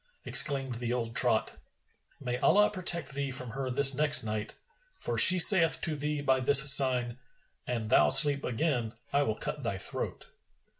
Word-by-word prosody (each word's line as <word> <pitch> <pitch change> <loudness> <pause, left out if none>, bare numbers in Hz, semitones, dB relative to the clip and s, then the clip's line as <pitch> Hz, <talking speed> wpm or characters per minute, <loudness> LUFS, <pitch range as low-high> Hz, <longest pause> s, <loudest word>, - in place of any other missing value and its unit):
Exclaimed 135 -4 0
the 120 -1 -7
old 115 -1 -7
trot, 120 -5 -2 0.6
"May 125 -2 -7
Allah 210 +1 0
protect 175 -6 -2
thee 140 0 -6
from 125 -2 -4
her 135 +1 -8
this 135 +2 +4
next 145 -1 +2
night! 110 -1 -8 0.4
For - - -7
she 185 - +6
saith 165 -2 +4
to 160 -3 -6
thee 150 0 -6
by 130 -2 -2
this 135 +2 +5
sign, 125 -3 +2 0.5
'An 115 -3 -7
thou 75 -7 +1
sleep 140 - +5
again, 120 -3 -5 0.2
I 140 - -1
will 110 -6 -4
cut 150 - -8
thy 115 -6 -7
throat.' - - -7
135 Hz, 165 wpm, -26 LUFS, 120-150 Hz, 0.6 s, she